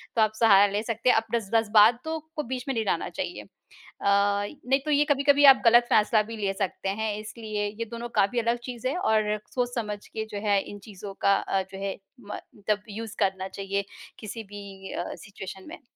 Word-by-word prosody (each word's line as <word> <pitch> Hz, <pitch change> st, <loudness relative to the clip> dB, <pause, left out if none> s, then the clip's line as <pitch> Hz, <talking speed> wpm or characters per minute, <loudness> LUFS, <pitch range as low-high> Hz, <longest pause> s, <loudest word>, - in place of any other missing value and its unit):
तो 225 Hz, -, +3 dB
आप 215 Hz, 0 st, +3 dB
सहारा 205 Hz, -3 st, +7 dB
ले 205 Hz, +1 st, 0 dB
सकते 230 Hz, +2 st, 0 dB
हैं। -, -, +6 dB
अप 225 Hz, 0 st, 0 dB
जज़् 215 Hz, -4 st, -2 dB
जज़्बातों 225 Hz, +8 st, +4 dB, 0.2 s
को 300 Hz, -, -2 dB
बीच 250 Hz, 0 st, -5 dB
में 270 Hz, -, 0 dB
नहीं 225 Hz, -1 st, -1 dB
लाना -, -, -1 dB
चाहिए -, -, -5 dB, 0.6 s
अ, -, -, -6 dB
नहीं 205 Hz, +7 st, +2 dB
तो 305 Hz, -, -1 dB
ये 295 Hz, 0 st, +4 dB
कभी-कभी 285 Hz, 0 st, +4 dB
आप 270 Hz, -1 st, +8 dB
ग़लत 240 Hz, +1 st, +7 dB
फैसला 215 Hz, +1 st, +4 dB
भी 225 Hz, +1 st, -8 dB
ले 200 Hz, -2 st, -1 dB
सकते 195 Hz, -1 st, -3 dB
हैं। 220 Hz, -1 st, -1 dB
इसलिए 215 Hz, -1 st, -4 dB
ये 230 Hz, -, -1 dB
दोनों 235 Hz, +1 st, -5 dB
काफ़ी 200 Hz, +5 st, +3 dB
अलग 235 Hz, +1 st, +1 dB
चीज़ 245 Hz, 0 st, -5 dB
हैं 265 Hz, -, -1 dB
और 215 Hz, -, +1 dB, 0.2 s
सोच-समझ 235 Hz, -5 st, -2 dB
के 220 Hz, 0 st, -5 dB
जो 205 Hz, -, -4 dB
है 200 Hz, -1 st, +4 dB
इन 205 Hz, -, -9 dB
चीज़ों 200 Hz, 0 st, -8 dB
का 200 Hz, -, +6 dB
अ, 195 Hz, -, -1 dB
जो 190 Hz, 0 st, -9 dB
है 195 Hz, -, -3 dB, 0.2 s
म 210 Hz, -2 st, -7 dB, 0.3 s
तब 210 Hz, -1 st, +1 dB
यूज़ 220 Hz, +1 st, -6 dB
करना 190 Hz, -2 st, 0 dB
चाहिए, 195 Hz, 0 st, -3 dB, 0.3 s
किसी 225 Hz, +1 st, -6 dB
भी 200 Hz, -2 st, -10 dB
अ, -, -, -4 dB
सिचुएशन 190 Hz, 0 st, -10 dB
में। -, -, -10 dB
215 Hz, 205 wpm, -26 LUFS, 200-235 Hz, 0.6 s, आप